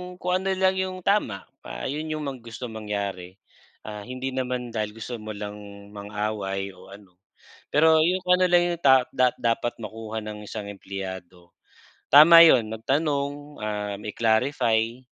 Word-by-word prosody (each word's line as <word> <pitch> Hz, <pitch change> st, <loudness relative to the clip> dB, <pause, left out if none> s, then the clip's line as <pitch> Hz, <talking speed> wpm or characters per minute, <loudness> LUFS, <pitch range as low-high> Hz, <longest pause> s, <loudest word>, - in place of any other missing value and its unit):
kung 180 Hz, 0 st, -1 dB
ano 190 Hz, 0 st, -1 dB
lang 190 Hz, 0 st, +3 dB
yung 185 Hz, -1 st, -4 dB
tama, 175 Hz, -, 0 dB, 0.2 s
ah, -, -, -7 dB
'yon 155 Hz, +3 st, -3 dB
yung 155 Hz, -1 st, -4 dB
mga 135 Hz, -2 st, -5 dB
gustong 115 Hz, 0 st, -7 dB
mangyari, 100 Hz, -4 st, -5 dB, 0.5 s
ah, 105 Hz, 0 st, -8 dB
hindi 130 Hz, +1 st, -4 dB
naman 125 Hz, -2 st, -3 dB
dahil 105 Hz, -1 st, -3 dB
gusto 115 Hz, +1 st, -6 dB
mo 110 Hz, -1 st, -7 dB
lang 105 Hz, 0 st, -7 dB, 0.3 s
mang-away 100 Hz, -1 st, -4 dB
o -, -, -16 dB
ano, 95 Hz, -3 st, -20 dB, 0.5 s
pero 160 Hz, +1 st, +5 dB
yung 180 Hz, +3 st, +1 dB
kung 180 Hz, 0 st, +3 dB
ano 185 Hz, 0 st, +2 dB
lang 175 Hz, 0 st, +5 dB
yung 170 Hz, -, -20 dB
ta 130 Hz, -2 st, +5 dB
da 125 Hz, -1 st, +4 dB
dapat 120 Hz, 0 st, -1 dB
makuha 110 Hz, 0 st, -6 dB
ng 105 Hz, -1 st, -8 dB
isang 105 Hz, 0 st, -7 dB
empleyado. 95 Hz, -3 st, -8 dB, 0.5 s
Tama 155 Hz, +4 st, +9 dB
'yon, 115 Hz, -8 st, +4 dB
magtanong, 140 Hz, +5 st, -1 dB, 0.2 s
ah, 105 Hz, -1 st, -3 dB
mai-clarify, 115 Hz, +2 st, 0 dB
115 Hz, 155 wpm, -25 LUFS, 105-145 Hz, 0.5 s, Tama